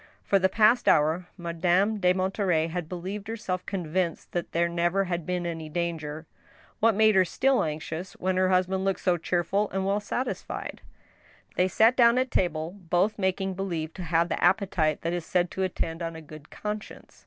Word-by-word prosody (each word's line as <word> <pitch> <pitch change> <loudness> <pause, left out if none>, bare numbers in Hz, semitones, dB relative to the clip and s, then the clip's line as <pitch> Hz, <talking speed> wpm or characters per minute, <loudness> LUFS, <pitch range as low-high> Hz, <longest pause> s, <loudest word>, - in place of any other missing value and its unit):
For 195 - +3
the 190 0 +3
past 220 +4 +3
hour, 160 +4 +3
Madame 175 +5 +1
de 180 -1 +4
Monterey 185 -3 +1
had 170 -1 -4
believed 190 +3 -5
herself 190 -5 -3
convinced 180 -2 -2
that 175 - -3
there 170 +1 +2
never 175 +3 +1
had 175 -3 -3
been 180 -1 -1
any 165 -2 -4
danger. 160 -2 -3 0.5
What 225 -1 +4
made 220 +1 +5
her 190 -1 +5
still 265 +8 +1
anxious 160 +3 -5
when 185 0 -1
her 185 0 +3
husband 185 +1 +1
looked 195 -1 -1
so 180 -3 +2
cheer 175 +1 0
ful 200 +4 0
and 190 0 -2
well 200 +1 +1
satisfied? 245 +5 -4 0.7
They 180 - +3
sat 220 +6 +4
down 235 -1 +5
at 255 0 0
table, 165 -3 0
both 185 +3 0
making 190 0 0
believe 170 -4 -3
to 185 - -8
have 170 0 +1
the - - -1
appe 190 +2 +3
tite 155 -3 +1
that 170 +1 -2
is 175 -1 -2
said 175 +1 0
to 190 - -4
attend 175 -3 -2
on 165 -1 -4
a 160 - -8
good 155 0 -12
conscience. 210 0 -7
180 Hz, 190 wpm, -27 LUFS, 170-195 Hz, 0.7 s, made